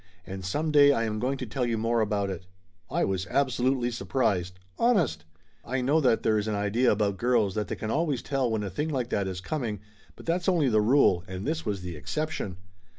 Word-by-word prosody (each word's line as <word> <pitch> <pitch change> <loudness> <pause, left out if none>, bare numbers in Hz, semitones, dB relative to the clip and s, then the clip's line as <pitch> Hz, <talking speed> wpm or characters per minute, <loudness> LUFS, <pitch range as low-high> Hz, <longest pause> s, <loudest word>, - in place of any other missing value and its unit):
"And 95 0 -7
some 150 - -1
day 145 -1 +7
I 115 -5 +1
am 110 -1 -2
going 130 +4 -1
to 130 - -4
tell 125 +3 -3
you 120 -2 0
more 115 +1 +1
about 100 -2 0
it!" 90 0 -7 0.4
I - - +1
was 95 -1 -2
absolutely 130 0 +1
surprised. 100 -7 -1 0.2
Honest! 170 - +2 0.4
I 130 +4 -2
know 145 +5 +3
that 125 -5 +2
there 110 -1 +3
is 105 - -3
an 110 - -1
idea 105 +5 +2
about 100 -2 0
girls 115 -3 +2
that 105 0 -2
they - - -3
can 110 - -4
always 150 -4 0
tell 135 -3 0
when 110 -2 -1
a 100 - -4
thing 150 - -2
like 130 -5 -2
that 100 -6 0
is 90 -1 -4
coming, 115 -4 -3 0.4
but - - -13
that's 175 +2 +1
only 165 -7 +3
the 110 -2 +3
rule 105 -6 +4
and 95 +1 -6
this 160 -3 -2
was 100 -3 -2
the 90 -2 -6
exception. 150 - -3
115 Hz, 220 wpm, -27 LUFS, 100-135 Hz, 0.4 s, day